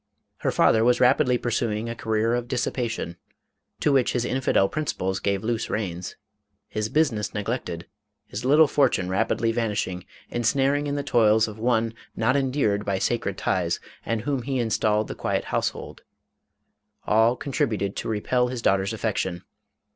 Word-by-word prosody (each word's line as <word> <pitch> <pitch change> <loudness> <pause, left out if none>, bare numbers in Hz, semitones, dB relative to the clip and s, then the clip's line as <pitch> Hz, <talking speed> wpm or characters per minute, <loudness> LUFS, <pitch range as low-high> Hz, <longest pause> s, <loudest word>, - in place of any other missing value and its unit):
Her - - -1
father 110 - +4
was 120 +1 +3
rapidly 125 0 +4
pursuing 115 -2 -1
a 115 - -3
career 110 0 0
of 120 0 -1
dissipation, 120 -7 -2 0.6
to 150 - +3
which 135 -3 +3
his 120 -1 0
infidel 125 -7 +2
principles 95 -8 -2
gave 100 0 -1
loose 115 0 -1
reins. 90 -4 -3 0.5
His 110 0 -3
business 125 -9 0
neglected, 100 -5 -3 0.4
his 100 - -6
little 150 +5 +6
fortune 125 -11 +2
rapidly 115 +4 +1
vanishing, 105 -6 -2 0.3
ensnared 135 +5 +1
in 140 - -1
the 145 - -2
toils 110 -5 +4
of 110 0 -9
one 115 -1 +1 0.2
not 125 +4 +2
endeared 130 -7 +1
by 100 -2 -1
sacred 100 -1 -1
ties 90 -2 0 0.2
and 115 -1 -1
whom 135 +2 -1
he 135 +2 -2
installed 110 -2 +1
in - - -14
the - - -18
quiet - - 0
household - - -2 0.5
— - - -47
all 115 +3 +4
contributed 115 -9 -1
to - - -3
re 105 -2 -1
pel 125 +1 +1
his 125 -1 -5
daughter's 95 +2 +2
affection. 95 -5 -2
115 Hz, 160 wpm, -25 LUFS, 105-125 Hz, 0.6 s, little